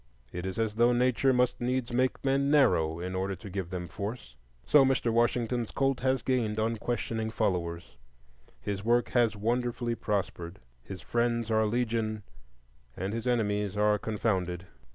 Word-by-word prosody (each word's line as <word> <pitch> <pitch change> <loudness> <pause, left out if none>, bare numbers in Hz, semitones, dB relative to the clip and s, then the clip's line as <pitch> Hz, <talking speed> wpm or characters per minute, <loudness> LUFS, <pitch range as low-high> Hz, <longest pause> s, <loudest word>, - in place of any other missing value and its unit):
It 90 +2 -4
is 95 - -5
as 110 -2 0
though 120 +2 +4
Nature 125 +2 +3
must 125 -1 +1
needs 125 0 -1
make 130 +2 0
men 135 +1 +2
narrow 85 - +3
in 90 +1 -4
order 95 +1 -2
to 95 +3 -10
give 95 -2 -4
them 90 -1 -4
force. 100 - -6 0.3
So 140 - +6
Mr. 130 -3 +1
Washington's 120 0 +1
cult 135 -1 0
has 130 +1 0
gained 115 -5 0
unquestioning 115 0 -2
followers, 85 - -2 0.6
his 100 -1 -4
work 120 +2 +2
has 115 -3 +2
wonderfully 120 +2 -1
prospered, 95 -5 -3 0.2
his 95 +8 -9
friends 120 -1 0
are 110 0 +3
legion, 110 -2 -1 0.7
and 95 +3 -3
his 115 +1 -3
enemies 105 -4 0
are 105 0 +3
confounded. 95 -5 -1
110 Hz, 155 wpm, -29 LUFS, 100-120 Hz, 0.7 s, So